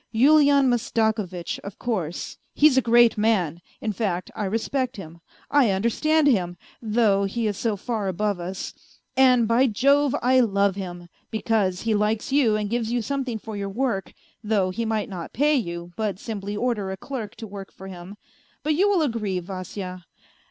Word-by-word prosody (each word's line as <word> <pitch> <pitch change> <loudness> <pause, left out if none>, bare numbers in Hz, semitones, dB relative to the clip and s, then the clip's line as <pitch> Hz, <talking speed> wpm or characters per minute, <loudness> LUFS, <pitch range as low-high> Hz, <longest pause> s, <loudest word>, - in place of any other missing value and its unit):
Yulian 280 +3 +5
Mastakovitch, 220 -7 -1
of 200 0 -9
course, 185 -9 -3 0.2
he's 295 -2 +5
a 260 - +5
great 235 -2 +4
man, 180 -7 +1 0.2
in 215 -2 -2
fact, 185 -3 -2
I 210 - -2
respect 245 +5 -1
him, 170 -3 -10 0.3
I 280 -6 +5
understand 235 +11 +2
him, 180 -10 +2 0.2
though 215 -3 +2
he 225 +4 -2
is 210 -1 0
so 220 +1 -1
far 215 -1 -3
above 200 +1 -1
us; 185 +2 -5 0.4
and, 255 -3 +5
by 240 +4 +4
Jove, 275 +5 +3
I 255 +1 +5
love 200 -4 +2
him, 175 -3 -7 0.2
because 215 -4 0
he 225 -1 0
likes 210 +3 0
you 265 -6 +3
and 210 -1 -1
gives 230 +1 -1
you 240 -1 0
something 265 -2 -2
for 220 0 -8
your 200 -1 -3
work, 220 -2 -2 0.3
though 205 -4 +1
he 230 +5 -3
might 220 -2 -1
not 180 -4 -7
pay 295 +4 +3
you, 175 -9 -2
but 210 -4 -2
simply 205 -1 -5
order 220 -5 -1
a 190 - -4
clerk 235 -1 -6
to 225 - -8
work 195 -2 -9
for 190 - -12
him 185 +2 -9 0.5
but 305 +2 +1
you 385 +7 +3
will 375 -5 +3
agree, 215 -9 -1
Vasya. 185 0 -7
215 Hz, 175 wpm, -24 LUFS, 195-245 Hz, 0.5 s, Yulian